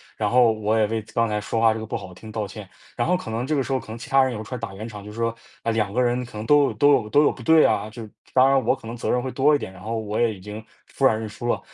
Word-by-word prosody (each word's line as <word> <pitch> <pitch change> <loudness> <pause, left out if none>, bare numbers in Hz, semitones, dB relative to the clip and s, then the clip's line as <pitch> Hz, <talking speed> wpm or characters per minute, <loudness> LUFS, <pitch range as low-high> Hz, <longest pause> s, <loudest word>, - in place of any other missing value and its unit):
然 105 -2 -1
后 120 -1 +5
我 110 0 0
也 110 - +4
为 110 +1 -2
刚 115 0 +3
才 105 -1 -2
说 110 +2 -2
话 115 -1 +4
这 110 - -5
个 110 - -6
不 - - -3
好 90 - -10
听 110 +4 -11
道 110 -2 -3
歉。 100 0 -10 0.3
然 120 - 0
后 180 0 +3
可 115 -11 -7
能 115 +3 -2
这 155 - 0
个 135 - +1
时 130 - -6
候， 130 - +1
可 - - -14
能 110 - -7
其 120 - -9
他 135 -1 +5
人 130 - 0
有 110 - -5
出 125 - -9
来 125 - -4
打 95 - -6
圆 110 +4 -6
场， 105 -3 -9
就 105 - -9
是 110 - -12
说， 115 0 0 0.3
嗯， 115 - 0
两 105 -3 0
个 120 - -1
人 120 +1 0
可 120 -3 -11
能 110 - -5
都 145 +2 +5
有 - - -1
都 145 0 +4
有 110 -6 +1
都 145 +6 +4
有 - - +4
不 - - -11
对 160 +6 +5
啊， 105 +1 +1
就 110 0 -9 0.3
当 130 +1 +6
然 135 -1 +3
我 - - +2
可 - - -16
能 115 +2 -6
责 115 - -4
任 125 - +2
会 130 0 -4
多 145 +2 +3
一 - - +3
点， 95 - -7
然 90 - -14
后 115 +2 -3
我 110 -1 -3
也 115 -2 +3
已 100 - -9
经 105 +3 -8 0.2
服 135 - -1
软 110 -4 +4
认 110 - -4
输 120 +3 -7
了。 - - +1
115 Hz, 390 characters per minute, -23 LUFS, 105-125 Hz, 0.3 s, 当